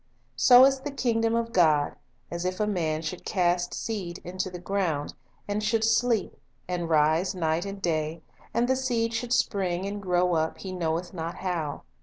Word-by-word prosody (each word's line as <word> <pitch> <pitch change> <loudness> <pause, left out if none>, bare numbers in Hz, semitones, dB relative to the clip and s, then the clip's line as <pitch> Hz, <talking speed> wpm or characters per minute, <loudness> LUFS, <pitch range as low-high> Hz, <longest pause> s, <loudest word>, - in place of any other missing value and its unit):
"So 250 0 +8
is 270 0 +3
the 285 +2 -5
kingdom 230 -4 0
of 230 0 -1
God, 155 -6 +3 0.4
as 170 0 -3
if 185 +1 -2
a 210 - +2
man 165 -6 -1
should 170 +3 -5
cast 175 -2 0
seed 195 -7 -4
into 185 +1 -3
the 180 - -7
ground; 175 -5 -2 0.3
and 205 +1 -1
should 220 +1 +1
sleep, 225 -1 +2 0.3
and 175 -2 -2
rise 160 +5 +3
night 165 0 0
and 200 0 -6
day, 160 -2 -2 0.3
and 235 +1 +1
the 260 - +3
seed 235 -3 0
should 235 +1 -3
spring 190 -6 +1
and 200 +1 -4
grow 180 -1 +2
up, 160 -1 0
he 190 - -7
knoweth 175 0 -2
not 165 -1 -4
how. 165 -6 -3
185 Hz, 180 wpm, -27 LUFS, 170-225 Hz, 0.4 s, So